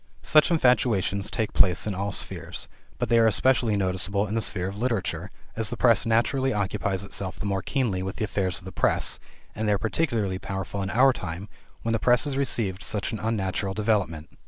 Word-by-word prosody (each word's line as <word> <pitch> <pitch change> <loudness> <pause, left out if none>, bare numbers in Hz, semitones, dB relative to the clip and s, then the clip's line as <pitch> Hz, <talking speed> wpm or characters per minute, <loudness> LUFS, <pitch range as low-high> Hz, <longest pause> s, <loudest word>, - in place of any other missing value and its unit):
Such 155 +1 +5
infatuations 120 - +2
take 110 -2 -2
place 90 -3 +3
in 105 - -2
all 100 +2 -2
spheres, - - -4 0.3
but - - -1
they 115 - +4
are 115 - +5
especially 115 -1 +2
noticeable 95 +1 0
in 105 - -5
the 115 - 0
sphere 95 -4 0
of 100 - -6
literature, 95 -7 -2 0.3
as 110 -1 +1
the 120 - -4
press 115 -1 +3
naturally 130 +4 +2
occupies 100 -2 -1
itself 100 -1 -4
the - - -5
more 100 -1 -1
keenly 115 -6 -1
with 95 0 -4
the 110 - -2
affairs 95 -3 -1
of 95 - 0
the 95 - -7
press, - - +2 0.3
and 110 +1 -3
they - - +4
are - - +2
particularly 110 - -1
powerful 95 +1 -4
in 95 - -3
our 130 +5 +4
time 95 0 -6 0.3
when 115 - 0
the 115 - +1
press 120 +2 +4
has 145 -3 -1
received 115 -8 0
such 105 -2 -2
an 110 - -4
unnatural 100 -3 -2
development. 100 -8 -1
105 Hz, 205 wpm, -26 LUFS, 95-115 Hz, 0.3 s, Such